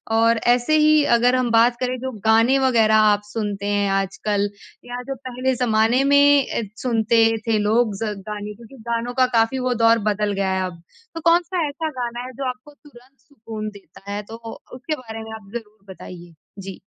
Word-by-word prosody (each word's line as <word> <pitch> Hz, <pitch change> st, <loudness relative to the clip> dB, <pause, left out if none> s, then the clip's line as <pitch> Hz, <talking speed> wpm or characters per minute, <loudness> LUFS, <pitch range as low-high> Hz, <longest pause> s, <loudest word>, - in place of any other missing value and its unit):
और 230 Hz, +1 st, +3 dB
ऐसे 245 Hz, +5 st, +3 dB
ही 305 Hz, 0 st, +4 dB
अगर 245 Hz, +2 st, +3 dB
हम 255 Hz, -1 st, 0 dB
बात 230 Hz, +2 st, +4 dB
करें 255 Hz, 0 st, -2 dB
जो 260 Hz, +1 st, -4 dB
गाने 225 Hz, +4 st, +4 dB
वग़ैरह 230 Hz, -5 st, +3 dB
आप 210 Hz, -1 st, +4 dB
सुनते 205 Hz, -2 st, -4 dB
हैं 205 Hz, -1 st, +1 dB
आजकल 200 Hz, +1 st, -1 dB, 0.4 s
या 245 Hz, 0 st, -6 dB
जो 270 Hz, -, -3 dB
पहले 255 Hz, +1 st, -1 dB
ज़माने 235 Hz, +1 st, +2 dB
में 285 Hz, -1 st, +5 dB, 0.4 s
सुनते 230 Hz, -2 st, +2 dB, 0.3 s
थे 225 Hz, -1 st, +2 dB
लोग 215 Hz, +1 st, +1 dB
ज 215 Hz, -1 st, -2 dB
गाने 210 Hz, 0 st, -5 dB
क्योंकि 235 Hz, +4 st, -15 dB
गानों 235 Hz, +1 st, -2 dB
का 255 Hz, 0 st, +3 dB
काफ़ी 225 Hz, +4 st, +2 dB
वो 255 Hz, 0 st, 0 dB
दौर 230 Hz, 0 st, +5 dB
बदल 210 Hz, 0 st, -1 dB
गया 195 Hz, -1 st, -1 dB
है 190 Hz, 0 st, -1 dB
अब। 175 Hz, -2 st, -8 dB, 0.3 s
तो 330 Hz, -, -5 dB
कौन-सा 345 Hz, 0 st, +2 dB
ऐसा 315 Hz, +2 st, -4 dB
गाना 240 Hz, 0 st, -4 dB
है 255 Hz, -, -8 dB
जो 275 Hz, +2 st, -5 dB
आपको 255 Hz, +4 st, -9 dB
तुरंत 270 Hz, -2 st, -20 dB
सुकून 225 Hz, -5 st, -8 dB
देता 200 Hz, -1 st, -13 dB
है? 205 Hz, +1 st, -3 dB
तो 225 Hz, +2 st, -10 dB, 0.4 s
उसके 280 Hz, +5 st, -4 dB
बारे 225 Hz, -4 st, -9 dB
में 220 Hz, -, -10 dB
आप 205 Hz, -3 st, -13 dB
ज़रूर 215 Hz, -3 st, -9 dB
बताइए। 175 Hz, -2 st, -12 dB, 0.3 s
जी। 195 Hz, -1 st, -8 dB
230 Hz, 190 wpm, -21 LUFS, 210-255 Hz, 0.4 s, में